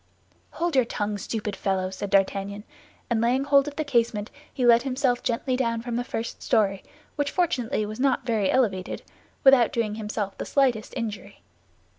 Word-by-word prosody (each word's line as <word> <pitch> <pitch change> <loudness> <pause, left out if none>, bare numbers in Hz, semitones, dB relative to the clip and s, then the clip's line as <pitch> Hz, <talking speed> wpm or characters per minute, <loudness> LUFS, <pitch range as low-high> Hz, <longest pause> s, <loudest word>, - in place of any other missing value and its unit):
"Hold 340 -2 -1
your 260 - +5
tongue, 210 -2 -3
stupid 210 0 -4
fellow," 190 -1 -1
said 195 +1 -5
D'Artagnan; 200 +1 +1 0.4
and 230 -2 0
laying 250 +3 +2
hold 280 0 +4
of 290 - -6
the 310 - -1
casement, 235 -6 0 0.2
he 255 - -1
let 235 -1 +6
himself 255 -1 0
gently 250 +2 -1
down 230 -3 -1
from 240 -1 -3
the 245 - 0
first 230 -2 -5
story, 195 -4 +1 0.4
which 290 -1 0
fortunately 250 - 0
was 215 +3 -7
not 265 -2 +1
very 220 -5 +1
elevated, 195 -8 0 0.4
without 270 -4 +6
doing 225 -3 -1
himself 210 -2 -4
the - - -3
slightest 255 -6 +1
injury. 220 -4 -6
230 Hz, 170 wpm, -25 LUFS, 210-260 Hz, 0.4 s, let